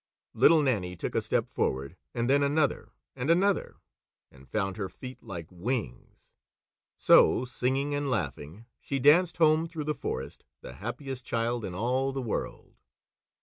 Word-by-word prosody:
Little 160 -2 +5
Nannie 95 -10 0
took - - -4
a - - +1
step - - 0
forward, 65 +1 -2 0.2
and 120 0 0
then 140 +2 +4
another 145 +1 +1 0.3
and 130 +2 -3
another, 190 +4 +2 0.6
and 65 -1 -18
found 95 -3 -1
her 95 -3 -3
feet 130 0 -10
like 90 -7 -7
wings. 120 +3 -5 0.7
So, 130 - +5
singing 130 +3 -1
and 145 -1 -1
laughing, 85 - -4
she 140 - -3
danced 155 +7 +4
home 160 0 +4
through 160 -2 -5
the 150 +1 -1
forest, 70 - -5 0.2
the - - -9
happiest 130 +3 -5
child 115 0 -1
in 90 - -5
all 130 +6 0
the 135 - -3
world. 120 -5 -5
125 Hz, 150 wpm, -28 LUFS, 100-145 Hz, 0.7 s, Little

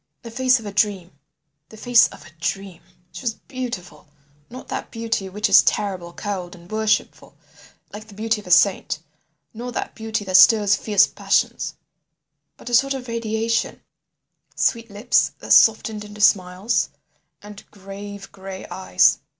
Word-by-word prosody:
"The 230 - -9
face 255 +1 +2
of 225 - -12
a 205 - -5
dream—the 175 -4 -5
face 245 +1 +5
of 145 - -14
a 155 - -15
dream. 195 +1 -4 0.3
She - - -9
was 235 -4 -2
beautiful. 235 - -7 0.4
Not 255 +2 -10
that - - -5
beauty 225 -4 -3
which 210 +3 -1
is - - +7
terrible, 185 -4 -2
cold, 185 -2 -5
and 175 +2 -17
worshipful, 215 0 -1 0.6
like 215 +1 -9
the 205 - -15
beauty 220 +1 -1
of 200 - -17
a - - -8
saint; 185 +2 +3 0.6
nor 240 +2 -6
that - - -4
beauty 220 -2 -4
that 185 -1 +4
stirs 205 +1 +6
fierce 205 -1 +3
passions; - - -1 0.8
but - - -15
a 245 - -5
sort 275 +3 +3
of 255 -1 -7
radiation, 230 0 -2 0.7
sweet 230 -1 0
lips 205 +4 +1
that - - +1
softened 215 -1 +4
into 210 0 -12
smiles, 195 +2 +2 0.5
and 205 0 -11
grave 200 0 -10
gray 190 -1 -9
eyes. 185 - +2
210 Hz, 150 wpm, -21 LUFS, 190-225 Hz, 0.8 s, is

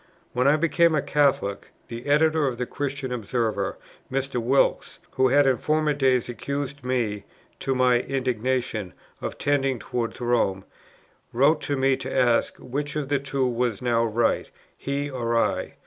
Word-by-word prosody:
When 125 +2 +2
I 145 - +6
became 170 +1 +3
a 150 - +2
Catholic, 140 -9 +1 0.2
the 120 +3 -8
Editor 155 +1 +3
of 125 -2 -3
the 125 - -2
Christian 140 -1 -4
Observer, 110 -3 -2 0.3
Mr. 135 -2 -1
Wilkes, 130 +4 +1
who 130 0 +3
had 140 +2 +4
in 130 -2 +3
former 155 0 +1
days 130 -4 +2
accused 140 +3 -4
me, 120 -5 -1 0.4
to 135 -1 -1
my 125 -1 +4
indignation, 125 -6 -2 0.3
of - - -4
tending 135 -2 +1
towards 120 +1 -4
Rome, 115 -6 0 0.7
wrote 145 +6 +3
to 145 -1 -1
me 135 0 +2
to 130 0 -6
ask, 120 -2 +2
which 145 +4 -4
of 145 -3 -2
the 145 -1 +2
two 135 -1 -1
was 120 -3 -1
now 120 -2 +1
right, 115 0 0 0.3
he 140 +1 -3
or 120 -4 -1
I? - - 0
130 Hz, 160 wpm, -25 LUFS, 120-140 Hz, 0.7 s, I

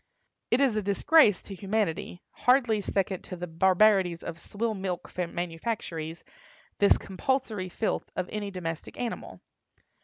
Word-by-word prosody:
It 240 - +3
is 265 -6 +3
a 215 - +1
disgrace 210 - +4
to 200 - -8
humanity, 195 -3 -2
hardly 245 -4 +3
second 195 -2 -1
to 185 - -6
the 180 0 -5
barbarities 185 +1 +3
of 165 0 -6
swill 220 +5 -2
milk 190 -3 -4
manufactories, 170 -1 -3 0.6
this 200 - +6
compulsory 210 -2 -2
filth 215 +4 -2
of 185 -1 -2
any 210 -1 -3
domestic 170 -4 -5
animal. 240 -2 -5
195 Hz, 130 wpm, -28 LUFS, 175-215 Hz, 0.6 s, this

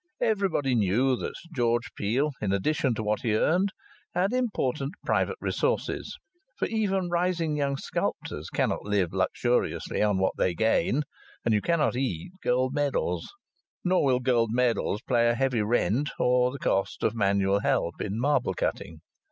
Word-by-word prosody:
Everybody 195 - +1
knew 120 +5 +2
that - - -5 0.2
George 120 -3 0
Peel, 130 +9 0
in 100 - 0
addition 125 +5 +1
to 110 - -3
what 105 0 0
he 110 -3 +1
earned, 180 - +2 0.5
had 190 +5 +1
important 150 - -1
"private - - +1
resources." - - -1 0.4
For - - 0
even 195 -5 0
rising 170 -3 0
young 140 -2 0
sculptors - - -3
cannot - - 0
live 100 -4 0
luxuriously 120 +6 0
on 105 -2 +2
what 95 0 +1
they 90 -2 +1
gain, 115 - +2 0.4
and 115 - +3
you 105 - +2
cannot 165 -3 +1
eat 125 - -2
gold 130 +1 +1
medals. 145 -1 -1 0.5
Nor 185 0 +2
will 130 -3 +3
gold 120 -3 +2
medals 120 -3 +1
pay 120 -2 +3
a 120 - +2
heavy 125 -2 +1
rent 120 +5 +1
or 125 0 +3
the 140 - -6
cost 95 -7 -1
of 110 - +2
manual 100 -2 +2
help 85 -4 0
in 105 +2 -3
marble 145 +4 +1
cutting. 80 -1 -3
125 Hz, 155 wpm, -27 LUFS, 105-150 Hz, 0.5 s, and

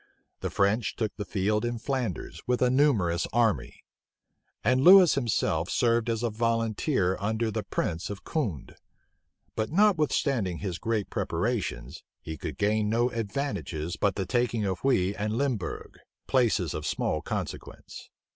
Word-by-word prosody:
The - - -3
French 100 +3 +1
took 110 -2 -2
the 105 - -5
field 105 +2 0
in 120 0 -2
Flanders 125 - -3
with 125 0 +1
a 125 - +3
numerous 110 - +2
army; 115 -3 0 0.8
and 130 +4 +3
Lewis 185 +2 +8
himself 100 -9 0
served 115 -1 +2
as 115 0 -1
a 120 - 0
volunteer 115 - 0
under 110 +2 -1
the - - -2
prince 80 +1 -3
of 100 -1 -7
Condé. 110 - -3 0.8
But 110 0 -1
notwithstanding 150 - +2
his 90 -2 -4
great 110 -3 -2
preparations, - - -2 0.2
he 80 - -7
could 70 - -6
gain 105 0 +1
no 120 +3 +1
advantages 105 - -3
but 100 -2 0
the 95 - -2
taking 120 +1 0
of 95 -2 -2
Huy 100 -8 +2
and 105 +1 -2
Limbourg, 125 - -3 0.3
places 110 - +1
of 75 -1 -4
small 75 - -1
consequence. - - -6
110 Hz, 145 wpm, -27 LUFS, 95-125 Hz, 0.8 s, Lewis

